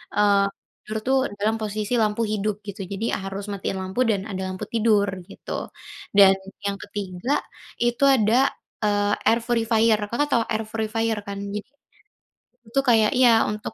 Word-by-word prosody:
eee, 200 Hz, -1 st, +4 dB, 0.4 s
tidur 215 Hz, +1 st, -2 dB
tuh 265 Hz, 0 st, +4 dB, 0.2 s
dalam 215 Hz, +2 st, +1 dB
posisi 215 Hz, +1 st, -3 dB
lampu 215 Hz, +1 st, +1 dB
hidup 210 Hz, 0 st, -1 dB
gitu. 200 Hz, +1 st, -6 dB
Jadi 200 Hz, +2 st, -4 dB
ya -, -, 0 dB
harus 195 Hz, +1 st, -5 dB
matiin 195 Hz, 0 st, -3 dB
lampu 190 Hz, +5 st, -5 dB
dan 205 Hz, -4 st, +1 dB
ada 190 Hz, -1 st, -4 dB
lampu 185 Hz, 0 st, -6 dB
tidur 215 Hz, -3 st, +3 dB, 0.2 s
gitu, -, -, -10 dB, 0.7 s
dan 195 Hz, -1 st, +9 dB, 0.3 s
yang 200 Hz, 0 st, -1 dB
ketiga 200 Hz, +5 st, -2 dB, 0.5 s
itu 240 Hz, +2 st, 0 dB
ada, 220 Hz, -1 st, +2 dB, 0.5 s
eee, 205 Hz, -1 st, +2 dB
air 230 Hz, -, +5 dB
purifier, 225 Hz, -2 st, +2 dB
Kakak 290 Hz, +6 st, 0 dB
tahu 235 Hz, -, +3 dB
air 220 Hz, 0 st, 0 dB
purifier 225 Hz, 0 st, -1 dB
kan 200 Hz, 0 st, -5 dB, 0.2 s
jadi, 210 Hz, +4 st, -6 dB, 1.0 s
itu 235 Hz, +5 st, 0 dB
kayak 220 Hz, -3 st, +5 dB
iya 255 Hz, -1 st, +6 dB, 0.2 s
untuk, 210 Hz, +1 st, -5 dB
215 Hz, 155 wpm, -24 LUFS, 200-225 Hz, 1.0 s, dan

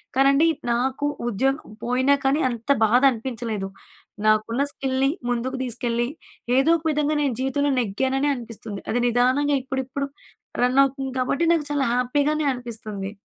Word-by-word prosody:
కానండి 275 Hz, +4 st, +4 dB, 0.2 s
నాకు 260 Hz, +4 st, 0 dB, 0.2 s
ఉద్యోగం 265 Hz, +6 st, +1 dB, 0.2 s
పోయినా 255 Hz, +3 st, +2 dB
కానీ 270 Hz, +3 st, +2 dB
అంత 235 Hz, +1 st, -7 dB, 0.2 s
బాధ 240 Hz, +4 st, +4 dB
అనిపించలేదు. 225 Hz, -4 st, -4 dB, 0.6 s
నాకున్న 215 Hz, +4 st, +2 dB
స్కిల్‌ని 270 Hz, 0 st, 0 dB, 0.2 s
ముందుకు 245 Hz, +2 st, -1 dB
తీసుకెళ్ళి 240 Hz, -1 st, -1 dB, 0.5 s
ఏదో 275 Hz, +5 st, +4 dB
ఒక 320 Hz, -, -15 dB
విధంగా 300 Hz, 0 st, 0 dB
నేను 280 Hz, -3 st, +1 dB
జీవితంలో 270 Hz, +2 st, 0 dB
నెగ్గాననే 265 Hz, +6 st, 0 dB
అనిపిస్తుంది. 225 Hz, -4 st, -8 dB
అది 245 Hz, -, +1 dB
నిదానంగా 255 Hz, +5 st, +2 dB
ఇప్పుడిప్పుడు 265 Hz, +1 st, -3 dB, 0.5 s
రన్ 250 Hz, +2 st, +3 dB
అవుతుంది 270 Hz, -1 st, -2 dB
కాబట్టి 270 Hz, +5 st, 0 dB
నాకు 320 Hz, -3 st, 0 dB
చాలా 285 Hz, -2 st, +1 dB
హ్యాపీగానే 290 Hz, +5 st, +1 dB
అనిపిస్తుంది. 215 Hz, -5 st, -6 dB
260 Hz, 130 wpm, -23 LUFS, 235-275 Hz, 0.6 s, కానండి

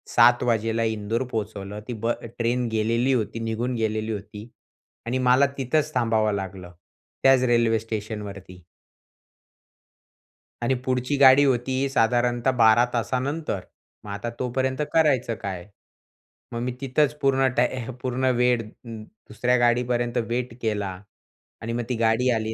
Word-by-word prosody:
7:00 120 Hz, 0 st, +6 dB
वाजेला 115 Hz, -1 st, 0 dB
इंदोर 110 Hz, +2 st, -1 dB
पोहोचवलं, 105 Hz, -2 st, -4 dB
ती 120 Hz, -, -4 dB
ब 115 Hz, +2 st, -1 dB, 0.3 s
ट्रेन 120 Hz, +1 st, 0 dB
गेलेली 115 Hz, +4 st, +1 dB
होती, 115 Hz, -2 st, -1 dB
निघून 115 Hz, +2 st, -2 dB
गेलेली 110 Hz, -1 st, -1 dB
होती 105 Hz, +2 st, -7 dB, 0.6 s
आणि 125 Hz, +3 st, -1 dB
मला 130 Hz, +2 st, +4 dB
तिथंच 150 Hz, +3 st, 0 dB
थांबावं 110 Hz, -3 st, +2 dB
लागलं, 95 Hz, -2 st, -6 dB, 0.5 s
त्याच 135 Hz, -1 st, +5 dB
रेल्वे 115 Hz, -2 st, +3 dB
स्टेशनवरती. 105 Hz, -4 st, -7 dB, 2.0 s
आणि 120 Hz, +3 st, +1 dB
पुढची 130 Hz, +2 st, 0 dB
गाडी 135 Hz, +1 st, +7 dB
होती 130 Hz, +1 st, +1 dB
साधारणतः 120 Hz, 0 st, +2 dB
12 110 Hz, +2 st, +6 dB
तासानंतर. 130 Hz, +2 st, -2 dB, 0.5 s
मग 100 Hz, -, -7 dB
आता 105 Hz, +4 st, -4 dB
तोपर्यंत 130 Hz, +2 st, -1 dB
करायचं 135 Hz, -7 st, +2 dB
काय? 95 Hz, -2 st, -5 dB, 0.8 s
मग 115 Hz, -, -4 dB
मी 125 Hz, -, -2 dB
तिथंच 140 Hz, +2 st, +1 dB
पूर्ण 135 Hz, -2 st, +3 dB
टाय 125 Hz, 0 st, +1 dB, 0.2 s
पूर्ण 130 Hz, 0 st, -1 dB
वेळ 125 Hz, -1 st, +3 dB, 0.2 s
दुसऱ्या 110 Hz, +2 st, -3 dB
गाडीपर्यंत 120 Hz, 0 st, +1 dB
वेट 120 Hz, 0 st, -2 dB
केला. 100 Hz, -4 st, -2 dB, 0.6 s
आणि 115 Hz, +1 st, -4 dB
मग 120 Hz, -, -2 dB
ती 125 Hz, -, 0 dB
गाडी 115 Hz, +2 st, +2 dB
आली. 110 Hz, -1 st, -1 dB
120 Hz, 130 wpm, -24 LUFS, 110-125 Hz, 2.0 s, गाडी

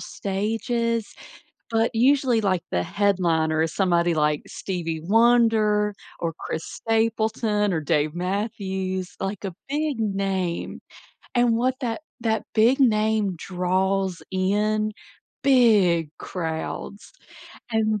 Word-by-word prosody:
stages, 225 Hz, +3 st, -2 dB, 0.6 s
but 225 Hz, +1 st, +2 dB
usually, 255 Hz, -1 st, +3 dB
like, 185 Hz, -4 st, +1 dB
the 90 Hz, 0 st, 0 dB
headliner 170 Hz, -, +1 dB
is 165 Hz, -, -2 dB
somebody 175 Hz, -3 st, +2 dB
like 150 Hz, -1 st, +1 dB
Stevie 165 Hz, -4 st, -4 dB
Wonder, 215 Hz, -1 st, +3 dB, 0.2 s
or 165 Hz, -1 st, -2 dB
Chris 160 Hz, -, -4 dB
Stapleton, 220 Hz, -2 st, 0 dB
or 160 Hz, -, 0 dB
Dave 150 Hz, +1 st, +1 dB
Matthews, 190 Hz, 0 st, -3 dB
like, 195 Hz, +1 st, -4 dB
a 185 Hz, -3 st, -5 dB
big 295 Hz, -3 st, -1 dB
name, 195 Hz, -4 st, -2 dB, 0.5 s
and 240 Hz, -2 st, +3 dB
what 255 Hz, +2 st, +1 dB
that 235 Hz, 0 st, -3 dB, 0.2 s
that 220 Hz, -1 st, 0 dB
big 235 Hz, +5 st, +4 dB
name 215 Hz, -4 st, +2 dB
draws 185 Hz, +1 st, -1 dB
in, 210 Hz, +3 st, +1 dB, 0.5 s
big 210 Hz, -, +4 dB
crowds. 165 Hz, +3 st, -5 dB, 0.6 s
And 215 Hz, -1 st, +1 dB
205 Hz, 105 wpm, -24 LUFS, 180-225 Hz, 0.6 s, big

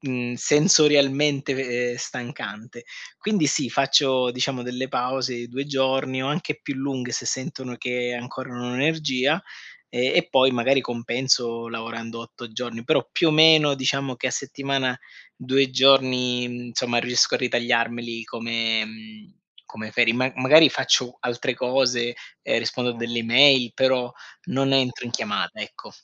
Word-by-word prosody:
mhmm, 125 Hz, -3 st, -4 dB
sensorialmente 145 Hz, -2 st, +3 dB
ve 125 Hz, -2 st, -2 dB
ehm, 120 Hz, -, -6 dB
stancante. 120 Hz, -2 st, -8 dB, 0.3 s
Quindi, 205 Hz, -7 st, 0 dB
sì, 125 Hz, -, 0 dB
faccio 135 Hz, -1 st, +2 dB
diciamo 125 Hz, 0 st, -2 dB
delle 125 Hz, +1 st, -4 dB
pause 125 Hz, 0 st, -2 dB
di 120 Hz, 0 st, -7 dB
2 135 Hz, +3 st, -5 dB
giorni 135 Hz, -1 st, -1 dB
o 135 Hz, -, -2 dB
anche 150 Hz, -1 st, -3 dB
più 140 Hz, -, -5 dB
lunghe 130 Hz, -2 st, -4 dB
se -, -, -3 dB
sentono 130 Hz, -1 st, -4 dB
che 125 Hz, 0 st, -3 dB
ancora 125 Hz, +2 st, -8 dB
non 125 Hz, 0 st, -5 dB
ho 125 Hz, -, -5 dB
energia, 150 Hz, +2 st, 0 dB, 0.5 s
e 125 Hz, +1 st, 0 dB
e 175 Hz, 0 st, 0 dB
poi 130 Hz, -4 st, +4 dB
magari 130 Hz, +3 st, +2 dB
compenso 120 Hz, -1 st, -1 dB
lavorando 115 Hz, 0 st, -7 dB
8 115 Hz, 0 st, -11 dB
giorni, 115 Hz, 0 st, -6 dB
però 155 Hz, -, +1 dB
più 165 Hz, -, +2 dB
o -, -, +3 dB
meno 155 Hz, -2 st, +6 dB
diciamo 135 Hz, 0 st, -1 dB
che 125 Hz, -, -4 dB
a -, -, -3 dB
settimana, 135 Hz, -1 st, -2 dB, 0.4 s
2 135 Hz, +1 st, +1 dB
giorni, 130 Hz, -2 st, +3 dB, 0.2 s
insomma, 120 Hz, 0 st, -1 dB
riesco 125 Hz, +1 st, +2 dB
a -, -, +2 dB
ritagliarmeli 120 Hz, -1 st, -1 dB
come 115 Hz, -1 st, -1 dB
mhmm, 220 Hz, -2 st, -14 dB, 0.3 s
come 110 Hz, 0 st, -9 dB
ferie. 115 Hz, -1 st, +3 dB
Ma 130 Hz, +2 st, 0 dB
magari 150 Hz, +5 st, +7 dB
faccio 125 Hz, -1 st, +1 dB
altre 125 Hz, +1 st, -2 dB
cose 125 Hz, -1 st, 0 dB, 0.3 s
e -, -, 0 dB
rispondo 125 Hz, -1 st, -2 dB
a 120 Hz, -, -7 dB
delle 115 Hz, 0 st, -3 dB
mail, 125 Hz, -1 st, +5 dB
però 130 Hz, -2 st, +1 dB, 0.4 s
non 135 Hz, 0 st, 0 dB
entro 130 Hz, -2 st, +1 dB
in 120 Hz, -, -6 dB
chiamata, -, -, -3 dB
ecco. -, -, -9 dB
125 Hz, 155 wpm, -23 LUFS, 120-135 Hz, 0.5 s, magari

